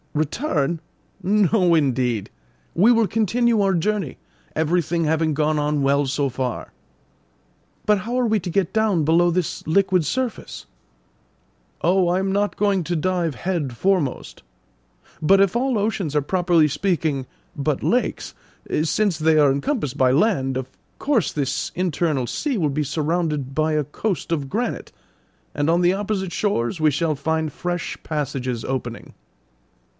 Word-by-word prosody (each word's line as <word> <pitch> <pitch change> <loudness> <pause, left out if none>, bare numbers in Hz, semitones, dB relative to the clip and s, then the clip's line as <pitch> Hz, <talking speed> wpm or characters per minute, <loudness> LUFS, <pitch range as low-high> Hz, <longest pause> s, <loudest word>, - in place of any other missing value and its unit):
"Return! 155 - -1 0.4
no, 195 -2 +3
indeed! 125 -7 0 0.4
We 210 +7 +5
will 230 -3 +3
continue 225 +2 +1
our 195 -1 +2
journey, 190 -3 -1 0.4
everything 165 +1 +1
having 160 0 +1
gone 155 +1 +1
on 150 -1 0
well 140 +1 +2
so 140 +1 0
far." 130 -1 -4 1.1
"But 210 -1 +3
how 235 +5 -2
are 250 - +2
we 220 -2 +2
to 175 - -5
get 185 0 0
down 210 -8 +2
below 170 +3 +4
this 175 -1 -2
liquid 185 +1 +2
surface?" 250 - -3 1.2
"Oh, 180 +1 +3
I 180 +1 +2
am 190 0 -1
not 205 +1 0
going 200 -3 +1
to 175 +2 -1
dive 170 -2 0
head 155 -9 -3
foremost. 185 -7 -1 0.8
But 195 +5 +5
if 195 +1 +3
all 255 0 +1
oceans 200 -7 -1
are 150 - +3
properly 175 0 +2
speaking 155 -3 -1 0.3
but 145 -1 -1
lakes, 250 +2 0 0.5
since 190 +2 +1
they 155 0 +3
are 145 -2 +5
encompassed 140 - -2
by 130 -2 +4
land, 135 - +1
of 130 -1 -4 0.3
course 275 - +1
this 140 -2 -2
internal 160 -7 0
sea 280 - -2
will 155 -6 +1
be 150 +2 -1
surrounded 150 -2 -2
by 155 0 +1
a 150 -2 0
coast 175 +4 -3
of 140 -4 -2
granite, 235 - -3 0.6
and 145 +2 0
on 170 +1 +3
the 180 +1 +3
opposite 195 -2 -2
shores 170 - -1
we 155 -1 +4
shall 155 +2 0
find 160 +2 -1
fresh 175 -1 -3
passages 135 -6 -3
opening." 120 -3 -5
165 Hz, 150 wpm, -22 LUFS, 145-195 Hz, 1.2 s, We